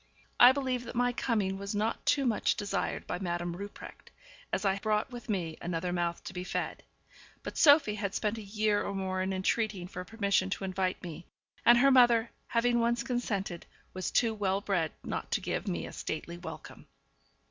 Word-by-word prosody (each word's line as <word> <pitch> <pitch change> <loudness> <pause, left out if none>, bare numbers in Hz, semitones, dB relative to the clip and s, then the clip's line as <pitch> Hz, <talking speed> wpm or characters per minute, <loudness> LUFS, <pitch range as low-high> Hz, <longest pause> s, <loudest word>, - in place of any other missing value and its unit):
I 245 - +10
believe 260 -3 -2
that - - -8
my 245 0 +2
coming 205 -6 0
was 200 +1 -4
not 215 +2 -1
too 280 -2 +3
much 225 -4 +2
desired 200 -2 -2
by 180 - -3
Madame 175 -2 -2
Rupprecht, 200 +2 -9 0.4
as - - -1
I 195 0 +2
brought 215 +3 0
with 240 -1 -9
me 170 -6 -2
another 175 +1 -2
mouth 170 -1 -1
to - - -7
be 180 -1 -4
fed; - - -3 0.6
but - - -6
Sophie 285 -7 +6
had 205 -2 -3
spent 215 +1 -1
a - - -6
year 210 0 0
or 200 - -3
more 190 -1 -1
in 190 +1 -1
entreating 190 0 0
for 180 0 -6
permission 200 -2 0
to 195 - -3
invite 185 0 -1
me, 170 -1 -8 0.4
and 240 0 +9
her 275 +3 +5
mother, 240 -3 +5 0.2
having 240 0 +2
once 235 0 +1
consented, 205 -8 -3 0.3
was 185 -1 -3
too 230 -2 +2
well 195 -2 0
bred 185 -6 0
not - - -4
to - - +2
give - - -3
me 85 -2 -2
a 85 - -9
stately 170 +2 -5
welcome. 160 -2 -9
200 Hz, 190 wpm, -30 LUFS, 185-230 Hz, 0.6 s, I